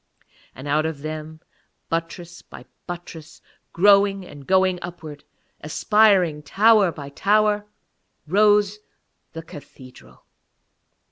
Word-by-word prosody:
And 130 +3 -9
out 155 +2 +1
of 150 -3 -7
them, 155 0 -7 0.5
buttress 170 +1 -5
by - - -14 0.2
buttress, 165 -2 -9 0.3
growing 195 +1 +3
and 145 -5 -13
going 185 -1 +2
upwards, 160 -4 -9 0.4
aspiring 185 -1 +2
tower 205 +4 +3
by 145 -3 -9
tower, 210 +6 +1 0.6
rose 205 +3 +2 0.5
the 165 - -8
cathedral. 135 -4 -15
175 Hz, 95 wpm, -22 LUFS, 155-200 Hz, 0.6 s, growing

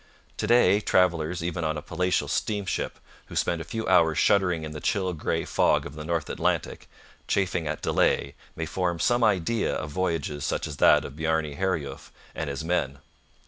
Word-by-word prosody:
To - - -2
day 105 -5 +5
travellers 85 -4 +1
even 85 0 -2
on 80 -1 -1
a - - -4
palatial 90 0 0
steamship, 100 -5 -2 0.3
who - - -10
spend 85 -1 0
a - - -4
few 110 +6 -4
hours 80 -2 +4
shuddering 90 -4 +3
in 75 - -5
the 75 - -6
chill 95 -4 0
grey 80 - -2
fog - - +2
of - - -7
the 75 0 -7
North 80 -1 -2
Atlantic, - - -2 0.4
chafing 90 -4 0
at 75 0 -4
delay, 70 - +1 0.2
may 80 - -3
form 90 +1 -1
some 120 +4 +2
idea 105 +2 +1
of 75 0 -4
voyages 80 -4 -2
such - - -1
as 75 -2 -6
that - - +5
of - - -8
Bjarne 80 -1 -1
Herjulf 80 -7 -3 0.2
and 80 -2 -4
his 70 +3 -4
men. 80 -5 -1
85 Hz, 185 wpm, -26 LUFS, 75-95 Hz, 0.4 s, day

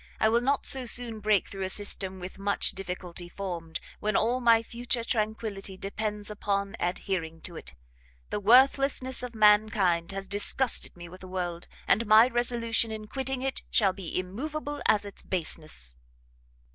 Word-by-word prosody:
I 220 - +4
will 235 +1 +3
not 275 +3 +1
so 260 -2 +2
soon 235 -2 0
break 210 -1 +2
through 195 - -8
a 190 - -1
system 190 -1 +3
with 185 +2 -8
much 200 0 +2
difficulty 180 -2 -6
formed, 175 -4 -5 0.2
when 215 -1 -1
all 240 +3 +2
my 230 -2 +4
future 240 +1 -2
tranquility 215 -4 -2
depends 210 +1 -4
upon 200 -1 -2
adhering 175 -2 -3
to 175 - -7
it. 70 - -8 0.6
The - - -1
worthlessness 260 +3 +4
of 245 -2 -6
mankind 210 -5 +3
has 195 0 -6
disgusted 205 +2 0
me 175 0 -9
with 185 +2 -13
the 185 - -9
world, 175 -2 -4 0.2
and 230 +1 +3
my 215 +2 +8
resolution 235 -2 0
in 215 -1 -6
quitting 265 +2 -3
it 270 0 -2
shall 195 -5 +3
be 185 -3 -5
immoveable 290 +11 -4
as 210 -1 +4
its 200 - -7
baseness." 155 - -2
210 Hz, 160 wpm, -28 LUFS, 185-235 Hz, 0.6 s, my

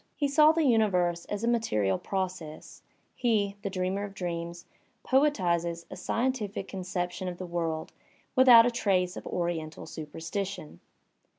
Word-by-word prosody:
He 290 - 0
saw 300 +2 +6
the 325 0 +1
universe 180 -8 +2
as 205 +1 -4
a - - +1
material 105 - +1
process; 185 -5 -5 0.3
he, 210 -5 +1
the 200 - -3
dreamer 190 +1 -2
of 200 -1 -7
dreams, 170 -1 -5 0.4
poetizes 175 - +1
a - - -6
scientific 225 -6 -2
conception 180 -1 -4
of 180 -1 -4
the 185 - -6
world 165 -2 -3 0.4
without 250 -3 +8
a 245 - +2
trace 185 -6 +1
of - - -8
oriental 165 -3 -3
superstition. 165 - -6
185 Hz, 135 wpm, -28 LUFS, 170-225 Hz, 0.4 s, without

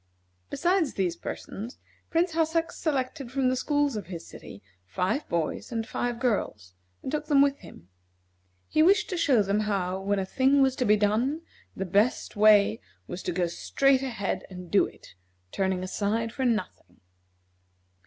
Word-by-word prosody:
Besides 345 0 +1
these 180 -3 0
persons, 220 +7 -7 0.3
Prince 340 +2 +1
Hassak 325 0 0
selected 275 -3 -3
from 265 -1 +1
the 255 - +1
schools 290 0 0
of 205 -5 -5
his 170 -2 -7
city 100 - -12 0.2
five 180 - -2
boys 170 +5 -2
and 225 -1 -3
five 240 -1 -2
girls, 105 - -2 0.3
and - - -4
took 300 0 -2
them 285 -3 +4
with 280 0 +3
him. 85 - -14 0.8
He 310 - +2
wished 400 +5 +4
to - - -1
show 270 -10 +3
them 200 +1 0
how, 190 -3 -1
when 200 +1 0
a 190 - -1
thing 270 +6 +3
was 265 -1 +2
to 250 - 0
be 210 -1 +5
done, 225 +9 +1 0.3
the 195 - -3
best 205 +7 +1
way 205 - +5 0.2
was 180 - -6
to - - -3
go 180 0 0
straight 265 +10 +2
ahead 235 -7 -3
and 180 -2 -10
do 205 - +4
it, - - -16 0.4
turning 190 -1 -1
aside 220 +4 -1
for 265 - -2
nothing. 220 -6 -3
225 Hz, 165 wpm, -27 LUFS, 190-275 Hz, 0.8 s, be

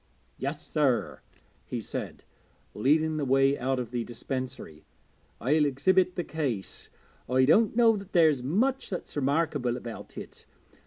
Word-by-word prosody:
'Yes, 145 +3 -4
sir,' 140 -6 0 0.4
he - - -5
said, - - -6 0.5
leading 155 +7 +2
the 150 - -1
way 135 +1 +3
out 130 +1 0
of 120 -3 -4
the 120 -2 -2
dispensary, 125 - -6 0.6
'I'll 150 +5 +2
exhibit 185 +7 +2
the 175 - -1
case. 135 -13 -4 0.4
I 130 +1 +4
don't 215 - +4
know 230 -2 +5
that 195 -1 -8
there's 160 -7 +4
much 240 - 0
that's 180 - -6
remarkable 140 -3 0
about 120 -2 -9
it. - - -10
140 Hz, 140 wpm, -28 LUFS, 130-165 Hz, 0.6 s, know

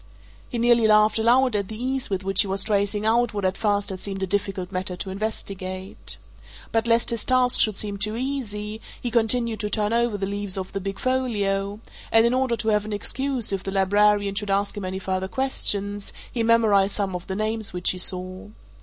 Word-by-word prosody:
He 240 - -4
nearly 235 -1 +4
laughed 215 +1 +4
aloud 245 +1 +3
at 200 -2 -1
the 220 - -7
ease 260 +1 -2
with 195 -1 -2
which 195 0 +3
he 205 - +1
was 195 +1 +2
tracing 205 0 0
out 230 0 +2
what 200 -2 -1
at 185 0 +1
first 205 -2 +1
had 185 - -5
seemed 195 0 -4
a - - +2
difficult 195 -1 -2
matter 185 0 -2
to 190 +2 -4
investigate. 190 -2 -4 0.5
But 225 +1 +1
lest 230 0 +2
his 230 -2 -2
task 255 -1 +3
should 215 -3 +3
seem 205 -1 -2
too 215 +2 0
easy, 220 -5 -4 0.2
he 240 - -4
continued 230 -1 +1
to 210 -1 -2
turn 210 0 0
over 235 -2 +1
the 195 - -2
leaves 200 -1 -2
of 190 -1 -5
the 195 - -3
big 195 +1 -4
folio, 205 -6 -1 0.3
and 225 0 +6
in 235 - +2
order 255 -2 +1
to 220 0 -2
have 210 -1 +2
an 215 0 -5
excuse 260 +3 0
if 195 - -1
the 195 - -5
librarian 205 +1 +3
should 205 0 -2
ask 200 +1 0
him 205 -2 -5
any 185 +1 -3
further 190 0 -2
questions, 205 -4 -1 0.2
he 235 - -2
memorized 220 -4 +3
some 195 -3 -2
of 180 +1 -6
the 190 - -3
names 215 +1 -2
which 180 0 0
he 185 - -4
saw. 185 +1 0
205 Hz, 215 wpm, -24 LUFS, 195-230 Hz, 0.5 s, and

